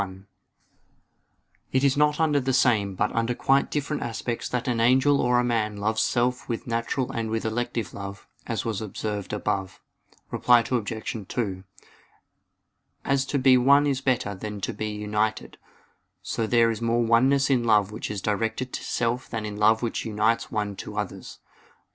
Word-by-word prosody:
1: 95 0 -7 1.5
It 130 +1 +2
is 140 -1 +3
not 150 +1 +2
under 155 -3 +3
the 130 0 -1
same 105 -7 +2
but 105 +3 0
under 115 +1 0
quite 135 +3 +2
different 150 0 -2
aspects 115 0 -3
that 125 0 -2
an 120 -2 0
angel 130 +4 +4
or 125 0 +3
a - - +2
man 110 -3 0
loves 110 +2 0
self 125 +1 0
with 115 - -3
natural 115 +2 -2
and 115 -1 -3
with 110 0 -2
elective 115 -1 -2
love, 100 0 -8 0.2
as - - -2
was 110 -3 -2
observed 105 -1 -4
above. 95 -2 -2 0.5
Reply 120 -1 +4
Obj. 110 -3 -3
2: 95 -6 -3 1.4
As 135 0 +1
to 140 - 0
be 130 -1 +5
one 140 +3 +5
is 135 -2 0
better 125 -6 0
than 105 +1 -6
to - - -2
be 110 +1 -4
united, 105 +1 -2 0.6
so 115 - -2
there 115 0 +4
is 115 - -5
more 115 +1 +1
oneness 135 +4 +3
in 125 -3 +3
love 105 -3 +3
which 110 - -5
is 105 -2 -4
directed 115 +4 -2
to - - -4
self 120 +1 -1
than 110 -2 -4
in 105 -1 -5
love 110 +2 +3
which 115 - -2
unites 110 +1 0
one 105 -2 -2
to - - -7
others. - - -5
115 Hz, 170 wpm, -25 LUFS, 105-125 Hz, 1.5 s, be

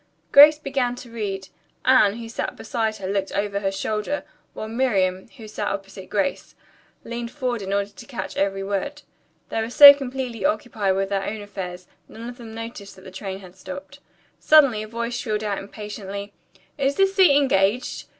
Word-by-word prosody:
Grace 295 +2 +9
began 270 -4 -1
to 245 -1 -11
read. 195 -4 -4 0.4
Anne, 220 -6 +5
who 230 -1 -7
sat 225 - -4
beside 220 -1 -2
her, 190 - -6
looked 195 0 -1
over 200 0 -1
her 195 -1 -1
shoulder, 215 +8 -2 0.3
while 215 - -5
Miriam, 200 -6 0
who 220 -3 -10
sat 210 -1 -4
opposite 195 -1 -6
Grace, 210 +7 -2 0.5
leaned 235 0 -5
forward 250 -4 -3
in 195 0 -5
order 200 0 0
to 195 - -13
catch 255 -4 -6
every 195 0 0
word. 205 +10 -3 0.5
They 225 - -1
were 220 - -3
so 285 +3 +11
completely 260 -5 -5
occupied 210 -3 0
with 195 0 -1
their 195 -1 -1
own 215 +1 -4
affairs, 185 -3 -7 0.2
none 230 +1 -9
of 245 +1 -9
them 230 -2 -9
noticed 225 -3 -8
that 190 - -16
the 190 - -11
train 190 0 -6
had 185 -1 -14
stopped. 280 +9 -9 0.4
Suddenly 275 -8 +5
a 215 - -6
voice 235 +2 -4
shrilled 220 -3 -2
out 205 -2 -2
impatiently, 200 -1 -7 0.5
"Is 275 0 +1
this 390 +2 +3
seat 365 -8 +6
engaged?" 245 -4 +1
215 Hz, 180 wpm, -23 LUFS, 195-250 Hz, 0.5 s, so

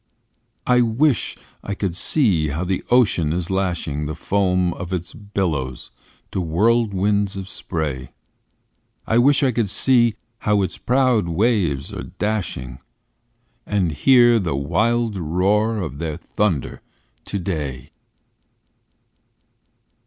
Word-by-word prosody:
I 125 0 +4
wish 120 +2 +1 0.2
I 100 - -4
could 95 -4 -2
see 95 - +2
how 75 +5 -2
the 95 0 -2
ocean 105 -11 +3
is 85 +2 -2
lashing 85 -6 -1
The 80 - -4
foam 90 -3 +1
of 90 0 -7
its 90 -2 -4
billows 85 - -3 0.4
to 95 - -2
whirlwinds 100 +2 +1
of 95 -1 -6
spray, 75 -9 -4 1.0
I 115 - +2
wish 140 +4 +4
I 130 - +3
could 115 -3 0
see 120 0 +3 0.2
how 105 -3 +2
its 95 - -4
proud 125 -6 +2
waves 85 - 0
are - - -5 0.2
dashing 85 - -3 0.9
And 95 -5 +1
hear 120 - +5
the 85 -8 -2
wild 105 +10 0
roar 100 +7 +1
of 80 -8 -5
their 80 -3 -3
thunder 100 -9 -2 0.4
today! 80 -10 -4
95 Hz, 115 wpm, -21 LUFS, 80-110 Hz, 1.0 s, hear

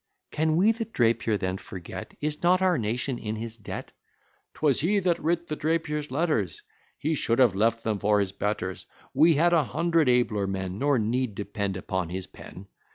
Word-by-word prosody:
Can 155 0 +1
we 195 +6 +5
the 225 0 -3
Drapier 115 - +1
then 95 -1 -2
forget? 90 -5 -9
Is 150 0 -2
not 180 +1 +4
our 185 -1 +3
nation 120 +4 -2
in 110 0 -4
his 115 +1 -5
debt? 105 - -7 0.6
'Twas 145 -3 +2
he 195 +7 +2
that 180 -3 +1
writ 170 +2 0
the 150 - -3
Drapier's 150 -1 -1
letters! 130 - -1 0.3
"He 155 +2 -1
should 115 -5 +1
have 125 -6 +5
left 115 +3 +1
them 110 -2 -1
for 105 +1 +3
his 100 -2 0
betters, 100 -2 -3 0.3
We 165 0 +5
had 170 +4 +3
a 165 -3 +4
hundred 165 +1 +1
abler 115 -5 +2
men, 95 0 -4
Nor 140 -1 +2
need 115 0 -1
depend 100 -1 -3
upon 95 -2 -3
his 95 +1 -4
pen. 95 - -12
120 Hz, 185 wpm, -27 LUFS, 105-160 Hz, 0.6 s, we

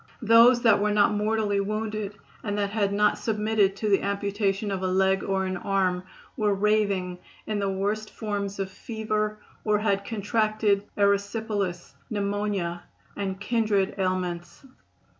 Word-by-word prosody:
Those 230 +2 +6
that 225 -4 +5
were 210 - +2
not 205 0 +3
mortally 210 -1 0
wounded 215 0 -3 0.3
and 205 -1 -2
that 200 -1 -1
had 205 -2 0
not 210 +1 +2
submitted 215 -2 +1
to 215 - -3
the 195 - +4
amputation 200 0 -1
of 190 -1 -2
a 190 - 0
leg 190 +1 +2
or 190 -1 0
an 185 0 -2
arm 185 -2 0 0.3
were 210 -4 +1
raving 200 -3 +1 0.3
in 215 -1 -2
the 200 -1 0
worst 205 +3 -2
forms 200 -2 -4
of 195 -1 -3
fever 215 0 -2 0.3
or 210 -1 +2
had 200 -2 0
contracted 215 -1 0
erysipelas, 200 -2 0 0.2
pneumonia 200 -4 -2 0.3
and 190 -1 -3
kindred 210 -3 +1
ailments. 180 +1 -2
205 Hz, 140 wpm, -26 LUFS, 195-215 Hz, 0.3 s, Those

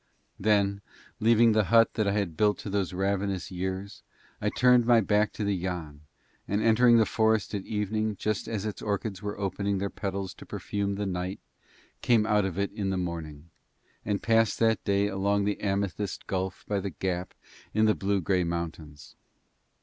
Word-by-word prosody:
Then 100 -1 +2 0.4
leaving 115 +1 +5
the 110 -1 +3
hut 115 +1 +4
that 110 -3 0
I 100 0 +1
built 105 +5 +1
to 100 - -7
those 100 -3 0
ravenous 95 0 -1
years 95 +2 -4 0.4
I - - +1
turned 125 -1 +4
my 120 -1 +6
back 105 0 +2
to 105 - -4
the 100 -1 +1
Yann 85 -5 -5 0.5
and 100 - 0
entering 115 +2 +5
the 110 - +5
forest 110 -2 +1
at 100 -2 -4
evening 110 0 -1
just 105 +1 -2
as 110 -3 -3
its 105 - -4
orchids 100 -1 -3
were 105 0 -4
opening 100 0 -1
their 100 +1 -2
petals 95 -1 -4
to - - -13
perfume 100 -1 -3
the 105 +1 -2
night 90 0 -3 0.6
came 115 -3 +3
out 105 -2 +2
of 95 -2 -4
it 100 0 -1
in 100 -2 -3
the 95 - -1
morning, 85 -3 -5 0.5
and 100 -1 -2
passed 115 -2 +3
that 110 -3 +2
day 100 0 +2
along 100 0 0
the 105 0 -1
amethyst 100 0 -2
gulf 95 -1 -3
by 100 -1 0
the 100 +1 -3
gap 90 0 -3 0.4
in 110 +1 +3
the 110 - +4
blue 100 -1 0
grey 90 +1 +1
mountains. 80 -3 -5
100 Hz, 180 wpm, -28 LUFS, 95-105 Hz, 0.6 s, my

